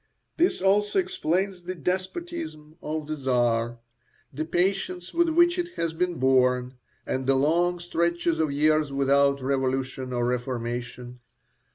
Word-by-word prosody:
This 335 - +2
also 205 - +2
explains 190 - 0
the 180 +1 -5
despotism 185 - -4
of 155 0 -3
the 155 +1 -3
Czar, 120 -4 0 0.6
the 155 +4 -3
patience 180 +1 -1
with 340 0 +3
which 345 +2 +4
it 350 0 -4
has 165 -1 -2
been 175 +1 -1
borne, 125 -2 +2 0.3
and 130 0 -2
the 135 - +4
long 170 +6 +2
stretches 170 -1 0
of 155 -2 +1
years 155 0 +2
without 140 0 +2
revolution 130 -1 -1
or 120 -1 0
reformation. 125 0 -4
155 Hz, 135 wpm, -26 LUFS, 130-180 Hz, 0.6 s, which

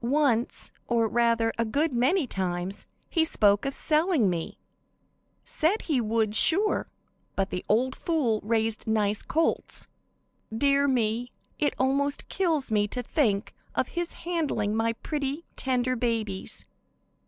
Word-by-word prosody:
"Once, 250 -2 +1 0.2
or 230 -2 +2
rather, 230 0 +2
a - - +4
good 280 +7 0
many 275 +8 +2
times, 185 -3 -3 0.2
he 325 - +2
spoke 205 -9 +3
of 275 - -1
selling 305 - +2
me; 165 -2 -4 0.9
said 345 +8 +1
he 285 -7 +1
would 220 -1 0
sure, 385 - +3 0.5
but 195 0 -1
'the 180 - -3
old 255 +5 +2
fool' 270 -10 0
raised 225 0 -1
nice 210 -1 +1
colts. 325 +1 -1 0.7
"Dear 280 +5 +2
me, 240 -1 0 0.3
it 295 - +1
almost 280 +2 0
kills 320 -10 +1
me 210 -1 +2
to 250 +4 -4
think 225 -7 0 0.2
of - - 0
his 345 0 -3
handling 300 -12 -1
my 225 +1 +1
pretty, 290 +5 -4
tender 255 -1 0
babies. 225 -5 -1
240 Hz, 130 wpm, -27 LUFS, 220-290 Hz, 0.9 s, a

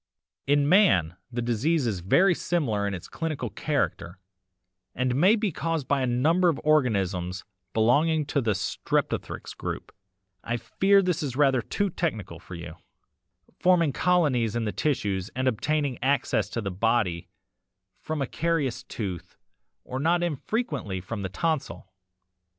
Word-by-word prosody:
"'In 145 0 +3
man 145 - +4 0.2
the 120 0 -2
disease 130 +6 +1
is 105 -6 -1
very 175 - +4
similar 125 -14 -1
in 100 - -2
its 85 - -9
clinical 155 -8 -4
character 85 0 -2 0.8
and 125 0 0
may 185 - +5
be 210 -3 -1
caused 165 -2 -2
by 140 -1 +1
a 130 - +1
number 160 +9 +3
of 160 - -1
organisms 95 - +1 0.3
belonging 145 - +3
to 140 0 0
the 110 -4 +1
streptothrix 95 -3 -2
group - - -6 0.5
(I 120 +1 -1
fear 195 - +3
this 180 -2 0
is 135 -5 -3
rather 135 -3 +3
too 200 - -1
technical 110 - -3
for 90 - -10
you) 85 -1 -8 0.8
forming 170 -5 +3
colonies 135 - +2
in 120 -1 -1
the 105 - -1
tissues 100 -10 -1
and 130 +1 0
obtaining 140 +2 0
access 130 -2 +1
to 115 - -3
the 100 -2 -3
body 95 -3 0 0.7
from 155 -3 -3
a - - -1
carious 155 -3 -1
tooth 95 -6 -6 0.5
or 130 - -5
not 170 +4 +2
infrequently 145 - -2
from 100 +4 -6
the 95 - -3
tonsil. 95 - -2
130 Hz, 145 wpm, -26 LUFS, 105-160 Hz, 0.8 s, may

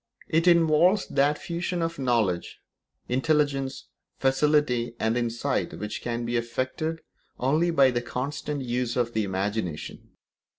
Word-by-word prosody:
It 165 +3 +2
involves 170 +3 +5
that 145 +2 +2
fusion 170 +1 -3
of 165 -2 -3
knowledge, 115 -9 0 0.5
intelligence, 135 0 0 0.3
facility, 135 -3 +2
and 110 +1 +1
insight 120 +3 -1
which 105 0 -5
can 120 0 -3
be 120 +1 0
effected 130 +7 -2 0.4
only 155 +7 +2
by 140 -6 +5
the 120 -1 -1
constant 140 +3 -4
use 120 -1 -1
of 120 -1 0
the 110 - +1
imagination. 95 -3 -3
130 Hz, 125 wpm, -26 LUFS, 120-150 Hz, 0.5 s, involves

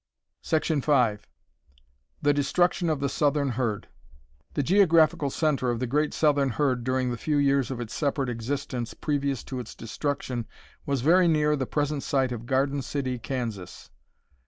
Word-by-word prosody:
5. 140 -9 +1 1.0
The 145 0 +4
destruction 170 +5 +1
of 150 -3 -1
the 140 - +1
southern 145 0 +1
herd. 115 -4 -2 0.7
The 145 - +1
geographical 165 -4 +4
center 140 -3 0
of 120 -1 -1
the 130 - -1
great 150 +5 0
southern 145 -3 +2
herd 125 0 0
during 130 0 0
the 120 - -3
few 150 +5 -1
years 140 -2 +2
of 130 -3 -4
its 120 -1 -6
separate 140 -2 -1
existence 120 0 -4
previous 140 -4 -1
to 130 - -5
its 120 - -8
destruction 125 0 -3 0.4
was 140 -3 0
very 175 +6 +5
near 150 -2 +3
the 130 -3 -3
present 145 -1 -1
site 135 -2 0
of 120 -1 -6
Garden 135 +2 +1
City, 130 -1 -3
Kansas. 110 - -5
140 Hz, 155 wpm, -26 LUFS, 125-150 Hz, 1.0 s, very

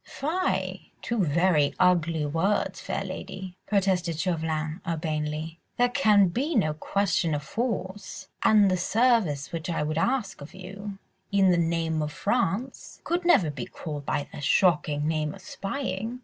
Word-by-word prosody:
"Fie! 350 +6 -2
two 235 -4 0
very 160 -2 +2
ugly 170 -4 +3
words, 165 +8 0
fair - - -3
lady," 185 -1 -7
protested 185 -5 +1
Chauvelin, 160 -1 -2
urbanely. 155 0 -3 0.2
"There 245 0 +4
can 210 -7 +4
be 280 - -1
no 155 -9 +2
question 165 -1 0
of 145 - -4
force, 200 - -4
and 205 -3 +5
the 185 - +2
service 210 - +2
which 165 0 -4
I 165 - 0
would 155 +1 -1
ask 210 - -1
of 145 - -10
you, 195 +2 -8 0.3
in 195 -2 +4
the 175 - +3
name 165 -1 0
of 150 0 -2
France, 235 +5 -2
could 345 +1 -1
never 185 - +4
be 135 -4 -6
called 150 -4 -6
by 145 - -1
the - - -7
shocking 150 -2 +2
name 155 -1 -1
of - - -14
spying." 225 +1 -4
180 Hz, 150 wpm, -27 LUFS, 155-205 Hz, 0.3 s, and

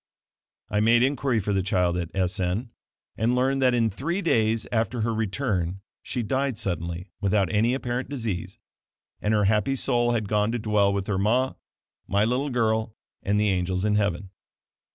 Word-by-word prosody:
I 105 - +1
made 115 +3 +4
inquiry 135 -3 +1
for 100 0 -1
the 95 - +2
child 90 -2 +1
at 85 -2 -3
S 95 -1 0
n 95 +7 -1 0.5
and 115 +3 +1
learned 135 +2 +1
that 125 -1 +4
in 115 -2 +2
three 170 - -2
days 115 -7 +2
after 115 +1 0
her 115 +1 0
return 95 -5 -1 0.2
she 125 - -3
died 130 +1 -1
suddenly, 85 0 -4
without 100 -4 +1
any 115 +4 +3
apparent 125 -1 -3
disease, 115 -10 -4 0.6
and 105 - 0
her 105 -1 +3
happy 105 +6 +2
soul 120 -2 +1
had 110 -3 -1
gone 105 +1 +1
to - - 0
dwell 105 -3 +2
with 100 -1 -2
her 95 -2 -1
ma, 125 +6 +2 0.5
my 100 +2 +2
little 130 +5 0
girl 110 -3 0 0.3
and 105 +1 +1
the 105 0 +2
angels 90 +1 0
in 105 - +2
heaven. 100 -2 0
110 Hz, 175 wpm, -25 LUFS, 100-120 Hz, 0.6 s, made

